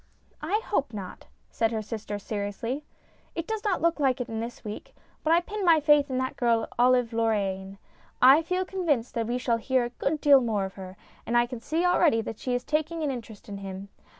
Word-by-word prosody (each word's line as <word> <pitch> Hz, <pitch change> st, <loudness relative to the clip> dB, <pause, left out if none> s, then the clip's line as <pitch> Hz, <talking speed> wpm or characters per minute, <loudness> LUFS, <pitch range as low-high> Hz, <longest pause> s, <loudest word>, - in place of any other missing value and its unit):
" -, -, -35 dB
I 425 Hz, +2 st, +2 dB
hope 280 Hz, -, -1 dB
not," 195 Hz, -3 st, -8 dB, 0.2 s
said 225 Hz, 0 st, +1 dB
her 220 Hz, -1 st, -2 dB
sister, 210 Hz, -1 st, -5 dB
seriously. 210 Hz, +7 st, -4 dB, 0.3 s
" -, -, -35 dB
It 335 Hz, -1 st, -3 dB
does 440 Hz, +1 st, -3 dB
look 340 Hz, -6 st, +1 dB
like 265 Hz, -3 st, +2 dB
it 250 Hz, -, -2 dB
this 230 Hz, 0 st, -6 dB
week, 210 Hz, 0 st, -7 dB, 0.3 s
but 315 Hz, -, +1 dB
I 340 Hz, +1 st, +5 dB
pin 415 Hz, +3 st, -5 dB
my 335 Hz, -3 st, +6 dB
faith 295 Hz, -1 st, +4 dB
in 260 Hz, -, -1 dB
that 260 Hz, 0 st, -2 dB
girl, 230 Hz, -3 st, +2 dB
Olive 245 Hz, -1 st, +4 dB
Lorraine. 200 Hz, -4 st, -1 dB, 0.4 s
I 270 Hz, +5 st, +8 dB
feel 365 Hz, +3 st, -1 dB
convinced 315 Hz, -11 st, -1 dB
that 230 Hz, -1 st, -1 dB
we 240 Hz, +1 st, -1 dB
shall 240 Hz, -2 st, +1 dB
hear 255 Hz, +2 st, +1 dB
a -, -, -4 dB
good 285 Hz, +5 st, -2 dB
deal 285 Hz, -3 st, +6 dB
more 215 Hz, -5 st, 0 dB
of 190 Hz, -, -7 dB
her, 190 Hz, -1 st, -10 dB, 0.3 s
and 240 Hz, -, +2 dB
I 240 Hz, -, +4 dB
can 245 Hz, -1 st, -7 dB
see 320 Hz, +9 st, -1 dB
already 340 Hz, -8 st, +4 dB
that 220 Hz, -1 st, -7 dB
she 250 Hz, -1 st, -1 dB
is 245 Hz, -, -2 dB
taking 315 Hz, +3 st, -1 dB
an 290 Hz, -, 0 dB
interest 225 Hz, -5 st, -8 dB
in 200 Hz, -1 st, -6 dB
him. 195 Hz, 0 st, -7 dB
245 Hz, 220 wpm, -27 LUFS, 220-305 Hz, 0.4 s, I